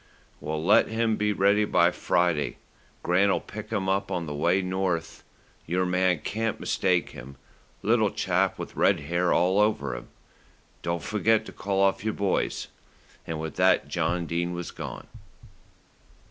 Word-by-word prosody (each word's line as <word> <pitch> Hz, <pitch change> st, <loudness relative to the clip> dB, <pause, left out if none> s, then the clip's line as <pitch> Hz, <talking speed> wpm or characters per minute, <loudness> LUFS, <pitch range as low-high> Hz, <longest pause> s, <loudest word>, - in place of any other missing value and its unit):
"Well, 75 Hz, +1 st, -4 dB
let 100 Hz, -, +5 dB
him 110 Hz, 0 st, 0 dB
be 105 Hz, 0 st, 0 dB
ready 100 Hz, +1 st, +3 dB
by 85 Hz, -4 st, +3 dB
Friday. 85 Hz, -1 st, 0 dB, 0.5 s
Grant'll 95 Hz, +3 st, +3 dB
pick 105 Hz, 0 st, -9 dB
him 95 Hz, -1 st, -2 dB
up 95 Hz, +1 st, 0 dB
on 90 Hz, -4 st, -3 dB
his 75 Hz, -, -4 dB
way 85 Hz, +6 st, +2 dB
north. 90 Hz, -3 st, -2 dB, 0.4 s
Your 90 Hz, +2 st, +1 dB
man 90 Hz, -2 st, +1 dB
can't 110 Hz, +1 st, -2 dB
mistake 90 Hz, -2 st, 0 dB
him, 70 Hz, +2 st, -11 dB, 0.5 s
little -, -, +3 dB
chap -, -, 0 dB
with -, -, -7 dB
red -, -, +3 dB
hair 85 Hz, +4 st, 0 dB
all 95 Hz, +3 st, +3 dB
over 105 Hz, -, +1 dB
him. -, -, -8 dB, 0.7 s
Don't 85 Hz, 0 st, -2 dB
forget 110 Hz, +1 st, +1 dB
to -, -, -9 dB
call 95 Hz, 0 st, -1 dB
off 95 Hz, 0 st, +2 dB
your 110 Hz, 0 st, -1 dB
boys;" 100 Hz, -2 st, -1 dB, 0.6 s
and 80 Hz, -1 st, -4 dB
with 80 Hz, -2 st, -6 dB
that -, -, +3 dB
John 85 Hz, -1 st, -1 dB
Dene 85 Hz, +2 st, -2 dB
was 85 Hz, -1 st, -5 dB
gone. -, -, -7 dB
90 Hz, 155 wpm, -26 LUFS, 85-100 Hz, 0.7 s, let